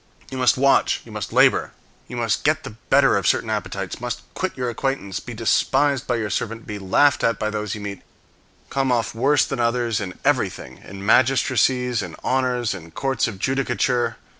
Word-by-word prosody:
You 130 - -5
must 125 -1 +4
watch, 140 +1 +3
you - - -12
must - - -5
labor, - - +3 0.3
you 125 - -7
must 115 -5 0
get 155 +1 +2
the - - -7
better 110 - +3
of - - -1
certain - - +1
appetites, - - -4
must - - -4
quit - - -3
your 125 -1 -2
acquaintance, 120 -5 -2
be 125 - -9
despised 135 +4 +1
by 125 - +1
your 110 -3 -2
servant, 115 +4 -3
be 105 -1 -6
laughed 120 +8 +3
at 115 -2 +2
by 110 - -2
those 105 -1 -3
you 105 - -8
meet; 100 -1 -6 0.7
come 135 -1 0
off 120 -2 0
worse 135 +5 +3
than 135 - -4
others 115 -2 0
in 90 -2 -6
everything, 65 +1 -1
in 100 +1 -9
magistracies, 125 0 +3
in - - -7
honors, 125 -3 0
in 85 -4 -9
courts 135 +10 -1
of 105 - -6
judicature. 125 +1 0
120 Hz, 190 wpm, -22 LUFS, 105-130 Hz, 0.7 s, must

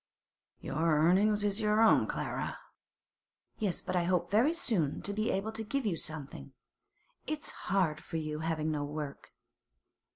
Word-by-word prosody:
'Your 145 - -4 0.2
earnin's 200 +6 +4
is 205 +1 +1
your 210 0 +3
own, 225 -1 +5
Clara.' - - -3 1.0
'Yes; 200 -5 -1
but 185 0 -3
I 175 -1 +2
hope 175 0 +1
very 230 +9 +4
soon 215 - -1
to 205 - -1
be 215 +2 0
able 195 +3 -1
to 225 0 -4
give 260 +4 -2
you 195 -5 +1
something. 150 - -5 0.7
It's 305 0 -4 0.2
hard 180 -6 +1
for 165 - -4
you, 155 -1 -3
having 160 -1 -1
no 150 -1 -1
work. 145 -1 -6
185 Hz, 155 wpm, -32 LUFS, 155-215 Hz, 1.0 s, own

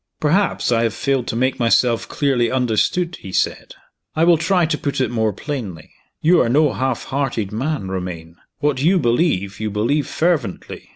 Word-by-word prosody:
"Perhaps 175 -1 +1
I 115 -1 +3
have 115 -2 0
failed 135 -3 -1
to - - -3
make 130 +2 0
myself 115 0 +2
clearly 130 -5 +1
understood," 130 - 0
he 95 - -10
said. - - -2 0.4
"I 160 - +2
will 170 -2 +5
try 175 +1 +2
to 155 - 0
put 140 -2 -3
it 130 -3 0
more 110 -2 +1
plainly. 100 - -6 0.3
You 170 +2 +5
are 115 - +1
no 145 +3 +3
half 130 -2 -2
hearted 130 -7 -2
man, 130 0 -2
Romayne. 90 -3 -6 0.2
What 145 -3 0
you 180 +6 +4
believe, 120 - 0
you 110 0 -2
believe 115 +9 0
fervently. 155 - -2
130 Hz, 175 wpm, -20 LUFS, 110-150 Hz, 0.4 s, will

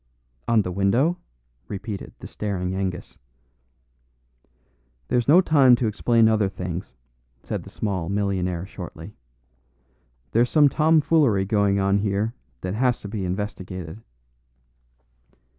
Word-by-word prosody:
"On 115 -3 +3
the 90 - -4
window?" 120 - +1 0.5
repeated 100 0 -6
the - - -11
staring 95 -3 -3
Angus. 95 -2 -4 1.9
"There's 120 -1 +1
no 165 +6 +7
time 140 -8 +5
to 120 - -2
explain 115 +1 +3
other 110 -3 +2
things," 90 -2 -6 0.5
said - - -4
the - - -12
small 95 -5 -3
millionaire 95 -3 -1
shortly. 90 0 -9 1.2
"There's 120 +2 +3
some 150 -2 +5
tomfoolery 150 -9 +3
going 100 -1 +2
on 100 +1 +2
here 105 +2 -1 0.3
that 90 0 -3
has 125 +2 +1
to - - -7
be 100 -2 -4
investigated." 95 -1 -5
100 Hz, 115 wpm, -24 LUFS, 95-120 Hz, 1.9 s, no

